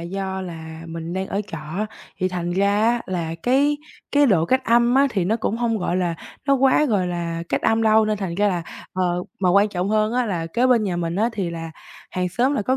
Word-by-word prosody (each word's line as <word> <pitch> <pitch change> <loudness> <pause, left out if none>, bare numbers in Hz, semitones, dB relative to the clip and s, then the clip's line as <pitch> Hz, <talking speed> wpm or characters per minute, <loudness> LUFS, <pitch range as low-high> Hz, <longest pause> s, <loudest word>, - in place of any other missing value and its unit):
do 190 +2 -4
là 160 -2 -8
mình 165 +1 -6
đang 190 +1 -2
ở 200 - -2
trọ 165 - -6
á, 165 +8 -4 0.3
thì 185 -1 +1
thành 175 -1 -3
ra 200 +2 +2
á 235 +2 +2
là 170 -3 -3
cái 285 +4 +3 0.3
cái 290 0 +5
độ 175 -8 +3
cách 260 +6 +1
âm 240 +1 +4
á, 275 +1 +5
thì 190 -6 0
nó 220 +5 +1
cũng 225 -1 -2
hông, 230 -2 0
gọi 180 0 -1
là, 175 -2 0 0.3
nó 275 - +4
quá, 270 +3 +4
gọi 205 -9 +1
là, 170 -1 -3
cách - - -1
âm 225 0 +2
đâu, 220 0 +5
nên 215 0 0
thành 185 -4 -3
ra 205 +2 +2
là 175 -3 -1 0.3
ờ, 180 -1 0 0.2
mà 185 - +2
quan 200 +2 +5
trọng 185 -1 -2
hơn 215 +1 +2
á, 250 -1 +1
là 170 -5 -2
kế 240 +10 +1
bên 240 -4 +4
nhà 180 -3 -1
mình 170 +1 -2
á 225 +3 +2
thì 195 -5 -2
là 165 -1 -6 0.4
hàng 180 0 -1
xóm 250 +9 +1
là 210 - 0
có 260 +5 +1
195 Hz, 250 wpm, -22 LUFS, 175-230 Hz, 0.4 s, cái